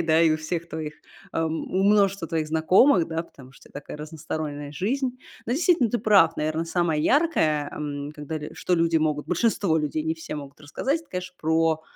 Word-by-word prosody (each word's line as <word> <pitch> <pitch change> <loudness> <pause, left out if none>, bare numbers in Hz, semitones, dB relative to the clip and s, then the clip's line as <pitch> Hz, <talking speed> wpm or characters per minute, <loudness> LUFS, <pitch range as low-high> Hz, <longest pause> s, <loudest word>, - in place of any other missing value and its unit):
да, 160 0 +3
и 165 - +5
у 155 - 0
всех 170 +2 -4
твоих 155 -1 -5 0.4
эм, 160 0 -2
у 190 - +1
множества 200 -3 +3
твоих 160 -1 -1
знакомых, 170 - +4
да, 165 0 -2
потому 135 -6 -16
что - - -18
у - - -23
тебя - - -6
такая 150 - -9
разносторонняя 150 -1 -5
жизнь. 250 - -2 0.3
Да, 235 - -2
действительно, 325 - +3
ты 240 - 0
прав, 195 -6 +5
наверное, 155 +2 -1
самое 165 -3 0
яркое, 160 - +2
эм, 145 -1 -5
когда 155 +1 -5 0.2
что 180 - 0
люди 165 -1 +2
большинство 160 +4 +1
людей 155 0 -1 0.3
могут 140 -2 -8
те - - -20
рассказать, 270 - -1
это, 320 - -28
конечно, 180 0 -5
про 160 0 +1
160 Hz, 185 wpm, -25 LUFS, 155-190 Hz, 0.4 s, и